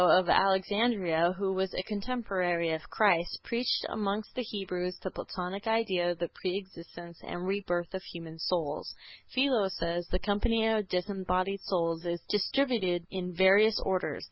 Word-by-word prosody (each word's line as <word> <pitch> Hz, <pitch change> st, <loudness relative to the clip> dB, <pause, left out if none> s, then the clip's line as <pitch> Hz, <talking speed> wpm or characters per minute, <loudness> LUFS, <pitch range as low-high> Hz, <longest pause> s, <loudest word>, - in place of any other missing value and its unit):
Philo 180 Hz, -, +7 dB
of 180 Hz, -2 st, -2 dB
Alexandria, 190 Hz, -3 st, +3 dB
who 195 Hz, -1 st, 0 dB
was 190 Hz, 0 st, -1 dB
a 185 Hz, -, -1 dB
contemporary 195 Hz, -6 st, -1 dB
of 160 Hz, 0 st, -2 dB
Christ, 175 Hz, -5 st, +3 dB
preached 235 Hz, +1 st, 0 dB
amongst 210 Hz, 0 st, -2 dB
the 255 Hz, -, -2 dB
Hebrews 185 Hz, -5 st, -3 dB
the 190 Hz, -, -3 dB
Platonic 190 Hz, +3 st, -5 dB
idea 200 Hz, -6 st, +2 dB
of 175 Hz, -, -2 dB
the 170 Hz, 0 st, -2 dB
pre 185 Hz, 0 st, 0 dB
existence 170 Hz, -3 st, -10 dB
and 175 Hz, +1 st, -5 dB
rebirth 180 Hz, -3 st, -1 dB
of 190 Hz, -, -3 dB
human 165 Hz, -3 st, -9 dB
souls. 160 Hz, -3 st, -2 dB, 0.4 s
Philo 255 Hz, -6 st, +3 dB
says: 170 Hz, -1 st, -2 dB
"The 180 Hz, -, 0 dB
company 220 Hz, +3 st, +1 dB
of 215 Hz, -3 st, +1 dB
disembodied 185 Hz, 0 st, -1 dB
souls 165 Hz, -3 st, -1 dB
is 170 Hz, 0 st, -1 dB
distributed 205 Hz, -5 st, +1 dB
in 180 Hz, -2 st, -4 dB
various 200 Hz, +4 st, +6 dB
orders. 190 Hz, -1 st, 0 dB
190 Hz, 155 wpm, -30 LUFS, 175-205 Hz, 0.4 s, Philo